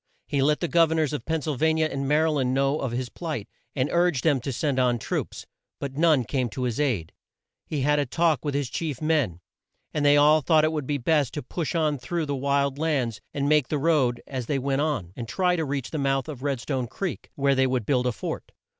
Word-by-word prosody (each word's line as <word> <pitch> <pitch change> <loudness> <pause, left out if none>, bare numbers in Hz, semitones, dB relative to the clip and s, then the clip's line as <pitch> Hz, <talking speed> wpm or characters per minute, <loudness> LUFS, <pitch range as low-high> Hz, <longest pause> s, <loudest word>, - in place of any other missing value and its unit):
He 140 - 0
let 150 +2 +2
the 175 - 0
Gov 165 -1 +4
er - - +1
nors 155 -3 +1
of 135 -6 -4
Penn 160 -2 -1
syl 155 -3 -2
va 160 +4 +3
ni 160 0 +1
a - - +2
and 135 -2 -3
Ma 150 - +4
ry 160 - +2
land 130 -4 0
know 140 +2 +1
of 130 - -2
his 125 +1 -2
plight, 155 - -5 0.3
and 130 -1 +1
urged 170 -6 +2
them 145 -5 +3
to 135 - -3
send 135 +1 -1
on 125 -1 +3
troops. - - -4 0.3
But 140 -1 -4
none 155 -4 +4
came 125 +2 -1
to 130 +4 -4
his 120 -1 -1
aid. 115 - 0 0.5
He 150 -3 -2
had 150 +2 +3
a 145 - 0
talk 160 0 +1
with 145 -2 -2
his 140 -2 0
chief 150 0 -3
men, 150 - 0 0.5
and 150 - -1
they 145 0 +6
all 150 +2 +6
thought 155 +1 +4
it 155 - +2
would 150 -4 -3
be 145 - 0
best 140 0 +1
to 150 - -4
push 170 -1 -3
on 155 -4 +1
through 170 +5 -2
the 145 -1 -2
wild 140 0 0
lands, 135 -9 -1
make 145 -1 +2
the 150 - -1
road 135 -6 +2
as 130 -4 -5
they 145 - 0
went 135 +1 0
on, 125 - -2
and 120 - -6
try 180 +6 +1
to 160 -2 -1
reach 140 -3 -3
the 155 - -2
mouth 135 0 0
of 145 -5 -7
Red 140 -2 -1
stone 130 -3 -2
Creek, 190 - -5
where 140 0 +2
they 130 0 +3
would 125 -4 -1
build 125 -1 +1
a - - +2
fort. 100 - -6
140 Hz, 250 wpm, -25 LUFS, 130-155 Hz, 0.5 s, they